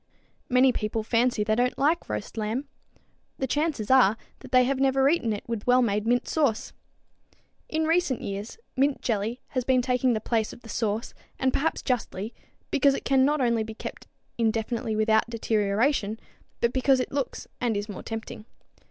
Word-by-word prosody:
Many 255 0 +5
people 215 -1 -2
fancy 230 -1 +2
they 215 +1 +1
don't 245 +3 +1
like 315 +5 +1
roast 105 - -4
lamb. 225 +6 -2 0.7
The 265 - -1
chances 290 -6 -1
are 240 -5 +6 0.2
that - - -13
they 255 -1 +6
have 265 +1 0
never 270 0 +3
eaten 285 -7 +2
it 205 - -3
with 230 -2 -4
wellmade 230 -4 +3
mint 245 +1 +2
sauce. 280 -9 0 1.0
In 315 0 0
recent 325 -5 +1
years 200 - -5 0.2
mint 275 +1 +1
jelly 225 +2 -1
has 255 -2 -1
been 255 0 +2
taking 250 0 +2
the 220 - 0
place 220 0 -1
of - - -14
the 225 - -13
sauce, 220 +1 -2 0.2
and 260 -1 +1
perhaps 320 +4 0
justly, 225 -4 -2 0.4
because 275 0 +4
it - - -6
can 265 -1 +4
not 295 0 +1
only 235 -2 +2
be 220 0 -8
kept - - -8 0.3
indefinitely 225 0 0
without 220 +1 +2
deterioration, 220 +1 0 0.4
but 235 +1 +2
because 265 0 +3
it 255 - -2
looks 275 -1 -3
and 235 -4 0
is 205 +1 -3
more 205 -4 -7
tempting. 225 -1 -7
240 Hz, 175 wpm, -26 LUFS, 220-265 Hz, 1.0 s, are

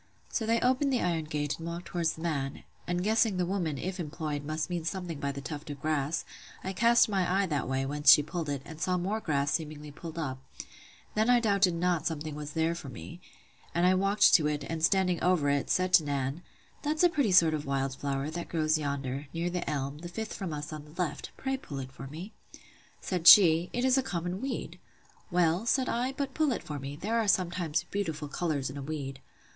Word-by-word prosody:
So 225 - -2
they 230 +1 +3
opened 260 +3 +2
the 255 - +1
iron 165 -3 0
gate 150 -1 -2
and 165 - -6
walked 170 +1 -5
down - - -11
towards 170 -2 +1
the 160 - -11
man; 140 -5 -2 0.2
and 175 0 -1
guessing 220 -1 +2
the 180 - +1
woman, 175 -6 -1
if 185 +4 -4
employed, 150 -2 -4
must 155 +1 -2
mean 175 -2 -3
something 170 -2 -4
by 140 0 -1
the 140 0 -7
tuft 150 +1 -7
of 145 -1 -6
grass, 155 0 -1 0.4
I 190 - -3
cast 235 +5 +5
my 190 -4 0
eye - - +1
that 150 -8 -2
way, 135 0 0
whence 145 +1 +5
she 150 - +7
pulled 155 +1 -4
it, 140 -2 -3
and 160 0 -10
saw 185 -1 +1
more 195 +5 -1
grass 140 -7 0
seemingly 150 -2 -3
pulled 160 +2 -9
up: 135 -5 -3 0.7
then 220 +2 +2
I 245 -1 +6
doubted 200 -5 +3
not 175 -1 0
something 155 -1 -3
was 150 0 -6
there 160 +1 +1
for 160 -5 -7
me; 165 +7 -10 0.5
and 170 +1 +3
I 185 - +5
walked 195 +2 +4
to 155 -5 +6
it, 150 -1 -2
and 165 -1 -4
standing 180 0 +2
over 175 -6 +3
it, 140 -1 0
said 185 0 +1
to 165 - +7
Nan, 140 +1 -2 0.4
That's 305 +2 0
a 350 - +7
pretty 285 - +1
sort 170 -3 +6
of 150 -2 -3
wild 135 -1 -1
flower, 140 +1 -2
that 170 +1 -5
grows 155 -1 +1
yonder, 140 -1 -3
near 170 +1 -1
the 180 0 -3
elm, 140 0 -3
the 175 +1 -7
fifth 220 +5 -5
from 190 -5 -4
us 150 +1 -5
on 150 -1 -7
the 150 +4 -16
left; 175 -5 -2
pray 265 0 -2
pull 150 - -8
it 130 -1 -6
for 135 +1 -9
me. 170 +10 -8 0.7
Said 180 -3 -1
she, 170 -2 +9
It 245 +1 -1
is 260 +1 +4
a - - +3
common 180 -5 -3
weed. 270 -1 -4 0.5
Well, 175 +4 +2
said 260 +1 +2
I, 250 +3 -1
but 275 0 -3
pull 310 -3 +2
it - - -5
for 150 -2 -5
me; 135 +1 -6
there 220 +9 -1
are 220 - 0
sometimes 175 -5 +1
beautiful 160 -7 -2
colours 145 -4 -2
in 140 - -8
a - - -5
weed. 135 -2 -5
165 Hz, 225 wpm, -29 LUFS, 145-185 Hz, 0.7 s, she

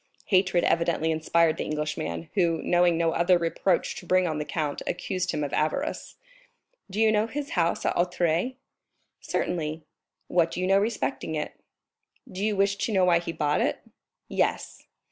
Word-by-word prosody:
Hatred 185 -2 +3
evidently 165 -1 +1
inspired 160 +1 +2
the - - -2
Englishman, 150 - -3
who, 170 -4 +2
knowing 175 -1 +3
no 165 -1 +2
other 175 +2 +3
reproach 170 +2 0
to - - -9
bring 185 0 +3
on 155 -2 -2
the 150 - -3
count, 150 -3 -3
accused 185 +1 -2
him 150 - -1
of 145 - -4
avarice. 275 - -2 0.7
"Do 195 +3 -4
you 220 -1 +5
know 215 +1 +2
his 285 +4 -5
house 170 -2 0
at - - +1
Auteuil?" 175 +5 +1 0.7
"Certainly." 155 -2 -2 0.4
"What 170 -2 +2
do - - -5
you 185 - 0
know 195 +1 +4
respecting 160 - -2
it?" 150 - -3 0.8
"Do 190 +2 -6
you 215 -1 +1
wish 200 +1 +2
to 225 - -2
know 190 -3 +3
why 175 -2 +4
he 170 0 -4
bought 150 -2 0
it?" - - 0 0.5
"Yes." - - -2
170 Hz, 170 wpm, -26 LUFS, 160-190 Hz, 0.8 s, you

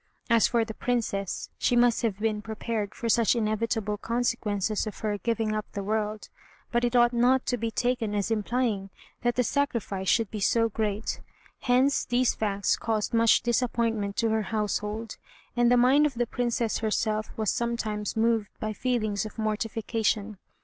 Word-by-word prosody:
As 230 -1 +5
for 235 -2 +1
the 220 - -6
Princess, 215 -6 -2
she 245 - +2
must 240 -1 +4
have 220 -5 -1
been 215 0 -1
prepared 220 -1 -4
for 235 - -4
such 230 +1 +3
inevitable 215 -1 -1
consequences 220 -3 -1
of 215 - -6
her 210 -2 -1
giving 225 -1 -1
up 215 0 -4
the 200 - -3
world; 215 +1 -2 0.4
but 240 0 +1
it 240 0 +1
ought 240 0 +5
not 250 +2 +3
to 245 - 0
be 230 -1 -2
taken 230 -2 -1
as 205 +2 -1
implying 220 -2 0 0.3
that 240 0 +1
the 250 - +2
sacrifice 235 -9 -1
should 225 -4 +2
be 215 - -4
so 230 +3 +2
great. 215 0 -2 0.4
Hence 260 +3 +2
these 245 +1 +2
facts 200 -2 0
caused 220 -1 -1
much 230 0 +5
disappointment 230 -4 0
to 230 - +1
her 220 0 +1
household, 215 +1 -2 0.4
and 240 0 +3
the 245 - +5
mind 270 +5 +5
of 275 - -7
the 240 +1 +1
Princess 235 -1 -1
herself 215 0 -1
was 215 -3 +1
sometimes 225 -3 -2
moved 225 -2 +2
by 215 0 -3
feelings 215 -3 -1
of 215 - -14
mortification. 220 -1 -1
225 Hz, 170 wpm, -27 LUFS, 210-240 Hz, 0.4 s, As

